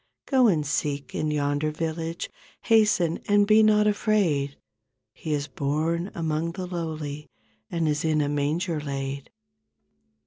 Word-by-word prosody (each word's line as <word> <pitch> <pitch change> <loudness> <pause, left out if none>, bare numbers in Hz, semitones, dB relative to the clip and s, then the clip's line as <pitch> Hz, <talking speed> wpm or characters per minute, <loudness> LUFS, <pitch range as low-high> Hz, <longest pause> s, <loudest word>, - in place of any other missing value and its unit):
Go 260 -3 +4
and 160 -8 +2
seek 140 -2 -2
in 155 - -1
yonder 145 0 0
village. 165 +1 -3 0.4
Hasten 210 -7 +3
and 205 0 +4
be 215 +1 +6
not 210 -1 +5
afraid. 195 -10 +1 0.6
He 160 - -6
is 145 -1 0
born 155 +6 -1
among 160 0 -1
the 185 +1 -5
lowly 155 -4 -5 0.4
And 165 -2 -1
is 150 0 0
in 155 -1 +2
a 145 - +1
manger 150 +4 -1
laid." 140 -1 -4
160 Hz, 135 wpm, -26 LUFS, 145-180 Hz, 0.6 s, be